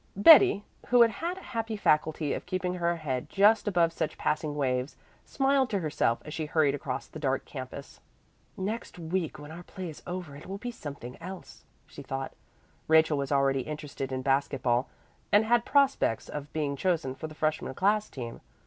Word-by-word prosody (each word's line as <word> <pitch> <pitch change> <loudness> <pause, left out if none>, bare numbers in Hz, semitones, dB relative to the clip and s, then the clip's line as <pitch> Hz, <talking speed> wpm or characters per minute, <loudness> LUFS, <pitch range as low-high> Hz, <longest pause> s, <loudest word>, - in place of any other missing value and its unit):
Betty, 205 - +8 0.2
who 245 -1 +7
had 330 - -1
a - - -9
happy 225 -2 -4
faculty 155 -4 +1
of - - -5
keeping 185 -1 -1
her 170 -1 0
head 135 -6 -3
just 210 +3 +4
above 170 -4 +2
such 155 - -3
passing 155 -1 -1
waves, 130 -1 -1 0.3
smiled 270 -1 +2
to 200 - 0
herself 150 -8 0
as 150 - -7
she 155 -2 -3
hurried 150 -3 +2
across 135 -2 -4
the 155 - -10
dark 135 -3 -1
campus. 130 0 -8 0.6
"Next 210 +3 -4
week, 170 0 -2
when 150 +1 -10
our 170 +2 -8
play 180 0 -7
is 150 - -13
over 175 -5 -5
it 145 - -11
will 195 +1 -5
be 245 +4 -5
something 140 - -9
else," 185 +2 -9 0.2
she - - -11
thought. 135 0 -5 0.5
Rachel 160 -2 +4
was 140 0 -3
already 135 -1 +2
interested 145 -2 -6
in 130 0 -3
basket 135 -1 0
ball 120 +1 +1 0.4
and 210 +2 +5
had 240 +1 +3
prospects 275 - +2
of 145 -1 -6
being 145 -3 -1
chosen 160 -4 0
for 155 +4 -6
the 155 - -12
freshman 155 -3 -1
class 210 +4 +2
team. 120 -4 -7
155 Hz, 185 wpm, -29 LUFS, 140-195 Hz, 0.6 s, Betty